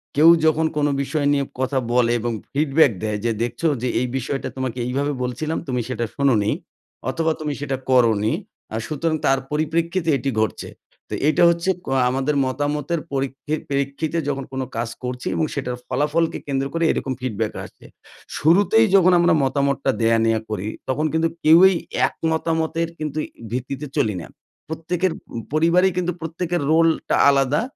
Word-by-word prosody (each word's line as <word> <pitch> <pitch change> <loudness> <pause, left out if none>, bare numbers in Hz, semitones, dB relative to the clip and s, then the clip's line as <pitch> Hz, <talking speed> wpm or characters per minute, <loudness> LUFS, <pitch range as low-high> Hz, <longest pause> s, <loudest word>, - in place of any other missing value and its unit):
কেউ 155 +3 +7 0.2
যখন 160 0 +3
কোনো 145 -1 +2
বিষয় 145 +1 -1
নিয়ে 140 -1 +1 0.2
কথা 130 +1 0
বলে 120 -1 +3
এবং 120 +1 -2 0.2
ফিডব্যাক 145 -1 +4
দেয় 105 -1 -1
যে 115 - +2
দেখছো 120 +7 -1
যে 125 - -1
এই 125 - 0
বিষয়টা 135 +2 -3
তোমাকে 130 -1 -3
এইভাবে 140 +4 -1
বলছিলাম 150 +6 -2
তুমি 125 -2 -1
সেটা 120 -2 -2
শোনো 140 -2 +3
নি, 105 - +1 0.6
অথবা 160 +3 0
তুমি 150 -2 -2
সেটা 135 -2 -2
করো 125 -3 +5
নি 110 - +2 0.4
আ - - 0
সুতরাং 155 +1 -1
তার 135 0 +3
পরিপ্রেক্ষিতে 165 +3 0
এটি 135 +2 -2
ঘটছে 110 - -2 0.4
তো - - -6
এইটা 155 - +3
হচ্ছে 170 +2 0 0.2
ক - - -20 0.2
আমাদের 135 +3 0
মতামতের 145 +4 -1
পরীক্ষি 135 +2 -2
প্রেক্ষিতে 140 +4 -1
যখন 135 -1 -2
কোনো 130 0 -2
কাজ 115 0 -1
করছি 125 0 -4
এবং 160 - +1
সেটার 125 -3 -3
ফলাফলকে 150 +5 0
কেন্দ্র 135 -1 -1
করে 165 0 0
এরকম 130 - -2
ফিডব্যাক 110 -3 -2
আসছে। - - -14 0.5
শুরুতেই 205 +8 +4
যখন 185 -1 +6
আমরা 170 0 +4
মতামতটা 140 0 +1
দেয়া 115 0 +4
নেয়া 115 -1 +2
করি 105 -1 -3 0.2
তখন 150 +4 0
কিন্তু 160 0 +2
কেউই 175 +5 +7 0.3
এক - - -10 0.2
মতামতের 160 0 0
কিন্তু 155 0 -3 0.3
ভিত্তিতে 130 +4 -4
চলি 105 -3 +1
না। - - -9 0.4
প্রত্যেকের 165 +3 -1
ম - - -11 0.3
পরিবারেই 170 +4 +4
কিন্তু 180 0 0
প্রত্যেকের 170 +1 -2
রোলটা 165 0 +3
আলাদা 140 +4 +2
145 Hz, 165 wpm, -22 LUFS, 130-160 Hz, 0.6 s, কেউ